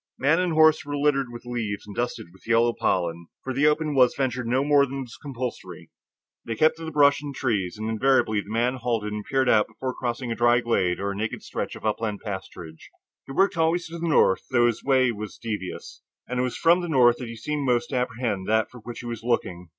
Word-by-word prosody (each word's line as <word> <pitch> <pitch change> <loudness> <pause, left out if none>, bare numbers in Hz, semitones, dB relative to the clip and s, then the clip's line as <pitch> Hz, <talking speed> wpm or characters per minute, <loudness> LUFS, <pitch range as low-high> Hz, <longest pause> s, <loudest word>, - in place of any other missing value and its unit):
Man 150 +6 +3
and 180 -2 0
horse 155 0 +5
were 145 0 -4
littered 140 -3 +1
with 120 0 -10
leaves 115 -4 -4
and 105 -1 -10
dusted 120 -8 -4
with 95 - -20
yellow 115 +1 +3
pollen, 85 -4 -1 0.2
for 130 - -3
the 140 +3 +3
open 150 0 +1
was 125 -3 +4
ventured 130 -3 -2
no 130 +3 +2
more 145 -1 +4
than 135 +1 -5
was 120 -3 -9
compulsory. 130 -3 -7 0.5
They 115 - -4
kept 155 +7 +3
to 165 - -7
the 160 - -5
brush 145 -2 +4
and 145 -2 -7
trees, 100 -6 -1
and 110 +1 -4
invariably 110 -2 +2
the 100 - -14
man 120 +4 0
halted 115 -4 -2
and 105 0 -4
peered 135 +1 0
out 105 -3 +4
before 130 -1 -5
crossing 120 -1 -3
a - - -1
dry 120 0 +4
glade 95 -7 0
or 100 0 -2
naked 110 +3 -4
stretch - - -4
of - - -10
upland 110 -1 -2
pasturage. 90 -5 -8 0.4
He - - -8
worked 195 +3 +2
always 165 +1 +1
to 170 +1 -7
the 170 - -2
north, 95 - +3
though 120 -2 +3
his 120 -2 0
way 130 -2 +3
was 105 -2 -7
devious, 105 -5 -6 0.3
and 125 +1 -3
it - - +2
was 125 - -3
from 170 +2 +4
the 175 - -4
north 120 -5 +5
that 125 - -6
he 115 - -7
seemed 145 +6 -3
most 120 -2 +1
to 130 - 0
apprehend 115 -5 -2
that 110 0 +2
for 125 - -11
which 120 +1 -8
he - - -10
was 115 -2 -5
looking. 95 -7 -2
120 Hz, 235 wpm, -25 LUFS, 110-140 Hz, 0.5 s, horse